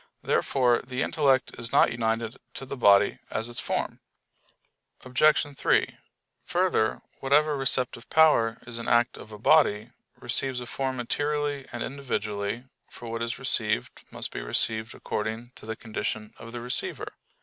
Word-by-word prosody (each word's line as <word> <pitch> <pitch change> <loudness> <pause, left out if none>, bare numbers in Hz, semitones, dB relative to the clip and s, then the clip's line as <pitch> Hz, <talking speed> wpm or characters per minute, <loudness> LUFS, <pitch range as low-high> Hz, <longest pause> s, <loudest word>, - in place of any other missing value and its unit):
Therefore 125 -3 +2
the 125 +1 -3
intellect 135 -4 +2
is 115 0 -6
not - - +5
united 115 0 -1 0.2
to 135 - -6
the 135 - -5
body 100 -6 +5
as 115 +2 -3
its 120 - -6
form. - - -2 1.1
Obj. 145 +2 +3
3: - - +1 0.5
Further, 175 -11 +1 0.2
whatever 150 +2 +3
receptive 125 -3 0
power 130 -8 +4
is 120 0 -3
an 115 - -6
act 120 +1 +3
of 110 - -11
a 105 - -8
body, 115 -3 +3 0.3
receives 125 +1 0
a 125 - -6
form 130 +2 -2
materially 145 +2 -1
and - - -4
individually; 110 -5 -3 0.3
for 120 - -9
what 115 0 -3
is 115 0 -2
received - - 0
must - - 0
be - - -5
received 110 - -1
according 110 +3 -4
to 110 - -13
the 110 - -3
condition 110 0 -4
of 115 - -9
the 120 0 -6
receiver. 125 +1 -3
120 Hz, 150 wpm, -27 LUFS, 115-135 Hz, 1.1 s, not